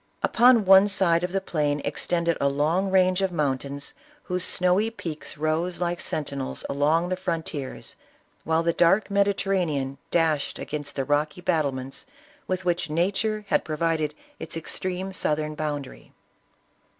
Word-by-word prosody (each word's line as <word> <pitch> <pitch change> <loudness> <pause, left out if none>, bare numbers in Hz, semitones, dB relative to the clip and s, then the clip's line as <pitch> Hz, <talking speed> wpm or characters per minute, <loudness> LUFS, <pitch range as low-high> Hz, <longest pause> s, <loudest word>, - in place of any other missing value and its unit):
Upon 240 -2 +5
one 195 +1 +8
side 175 -4 +2
of 180 - -1
the 195 - +1
plain 150 -6 -1
extended 170 -1 0
a 140 - +3
long 160 +7 +1
range 185 0 +3
of 190 -1 +1
mountains 140 -2 -2 0.3
whose 180 0 -2
snowy 185 +5 +2
peaks 165 -10 -6
rose 160 +3 -1
like 175 -1 -1
sentinels 140 -3 -4
along 155 +5 +1
the 185 - 0
frontiers, 165 -6 -4 0.5
while 160 +1 +1
the 170 0 +1
dark 190 +6 +3
Mediterranean 190 -9 0
dashed 160 -4 +1
against 145 -1 -5
the 135 - -1
rocky 150 +4 0
battlements 135 - -2 0.4
with 185 0 -2
which 175 -2 0
nature 205 +6 0
had - - +2
provided 155 -1 -1 0.2
its 160 0 -5
extreme 185 +3 -4
southern 155 -3 -1
boundary. 145 -3 -5
165 Hz, 140 wpm, -25 LUFS, 150-185 Hz, 0.5 s, one